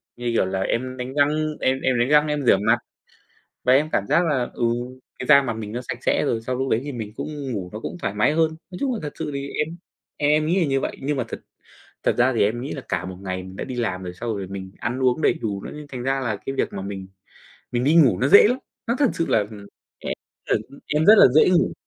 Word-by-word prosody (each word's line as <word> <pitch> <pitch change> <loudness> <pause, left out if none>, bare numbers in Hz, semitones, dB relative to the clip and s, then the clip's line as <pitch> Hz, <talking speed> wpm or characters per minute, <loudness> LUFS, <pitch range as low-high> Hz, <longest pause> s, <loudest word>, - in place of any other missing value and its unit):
như 120 0 -2
kiểu - - +3
là, 95 +1 -2
em 130 +5 -2
đánh 125 +1 -5
răng, 150 +2 +1
em 130 +1 +1
em 130 -2 +1
đánh 120 +2 +2
răng, 150 +1 +5
em 150 -1 -1
rửa 110 - +6
mặt. 100 - +3 0.9
Và 125 - +4
em 150 +4 +3
cảm 100 - 0
giác 170 - +3
là, 135 -6 0
ừ, 120 - -1 0.5
cái - - -4
da 140 -2 +8
mặt 125 -4 -2
mình 110 -2 -6
nó 120 - -3
sạch - - -2
sẽ - - +2
rồi, 115 - 0
sau 125 +3 -3
lúc 130 +1 -2
đấy 110 - +2
thì 145 - -5
mình 110 -5 -6
cũng 145 -1 -5
ngủ 95 -6 -4
nó 110 - -5
cũng 145 - -6
thoải 100 - -2
mái 105 +7 +3
hơn. 160 0 +2 0.2
Nói 180 - -7
chung 270 -2 0
là 225 - -3
thật 150 -2 -5
sự - - -3
thì 140 0 -4 0.2
em 160 +2 -9 0.4
em 145 0 +2
em 155 0 +3
nghĩ 175 +5 +2
là 170 - +3
như 135 -1 +1
vậy, - - -4
nhưng 145 +1 -1
mà 130 - 0
thật - - -6 0.6
thật - - +2
ra 125 +2 +4
thì 120 - +2
em 110 +4 +1
nghĩ 135 +4 -5
là 135 - -6
cả - - -1
một 90 0 -6
ngày 95 -1 -4
mình 95 +1 -10
đã - - -4
đi 130 - -6
làm 105 -7 -2
rồi, 90 -1 -5
sau 115 +3 -3
rồi 100 -1 -4
mình 95 0 -7
ăn 120 +4 -3
uống 130 +3 +1
đầy - - +5
đủ 105 - -4
nữa, - - -7 0.2
thành 125 -3 -6
ra 135 +1 0
là 120 -5 -1
cái 135 - -2
việc 135 - -1
mà 95 - -5
mình 95 -1 -6 0.7
mình 120 0 0
đi 150 +5 +3
ngủ 150 -8 +5
nó 130 - +2
dễ 200 +7 +8
lắm. 250 +3 +1 0.3
Nó 235 - +1
thật 280 -4 +4
sự 165 - -1
là, - - +3
ừm, 105 -1 -6 0.4
em - - -2 0.4
tần, - - +2
ư, 140 - -14
em 150 +2 +1
rất 215 - +9
là - - +9
dễ 155 - +6
ngủ. 180 -2 +3
130 Hz, 285 wpm, -23 LUFS, 110-150 Hz, 0.9 s, rất